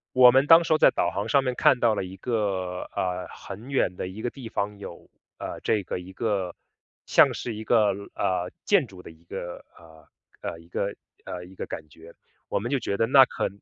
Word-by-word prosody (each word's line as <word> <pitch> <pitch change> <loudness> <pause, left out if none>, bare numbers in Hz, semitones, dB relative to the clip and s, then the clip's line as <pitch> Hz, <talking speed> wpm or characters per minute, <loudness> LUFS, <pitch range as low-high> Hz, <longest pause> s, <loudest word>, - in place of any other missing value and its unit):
我 125 -1 +9
们 135 +3 +4
当 165 +1 +8
时 165 - +1
候 - - +4
在 - - +6
导 85 - 0
航 100 +3 -3
上 140 +3 +4
面 130 -1 -1
看 125 - +4
到 115 -2 +3
了 100 - -2
一 95 +1 -8
个 95 -5 -2
呃， 90 0 -2
很 105 +6 -10
远 130 -9 +1
的 90 - -4
一 95 +4 -8
个 120 - 0
地 130 -5 -9
方 100 -1 -3
有， 85 - -10 0.3
呃， - - -6
这 105 -3 +1
个 90 - -4
一 90 +1 -10
个 100 -4 -2 0.5
像 - - +5
是 120 - -4
一 110 +1 -6
个 110 -2 +4 0.3
呃， 90 -1 -1 0.2
建 195 -10 +3
筑 95 -3 -13
的 - - -10
一 80 +1 -21
个， 90 -1 -7
呃， 80 -2 -17 0.3
呃， 80 - -5
一 85 - -17
个 100 +3 -3 0.3
呃， 90 -1 -6
一 90 - -14
个 - - -6
感 80 - -7
觉。 80 +2 -15 0.4
我 - - -1
们 115 +5 -3
就 140 - +2
觉 100 - -2
得 115 - +3
那 135 +3 +8
可 - - -2
100 Hz, 240 characters per minute, -26 LUFS, 90-120 Hz, 0.5 s, 我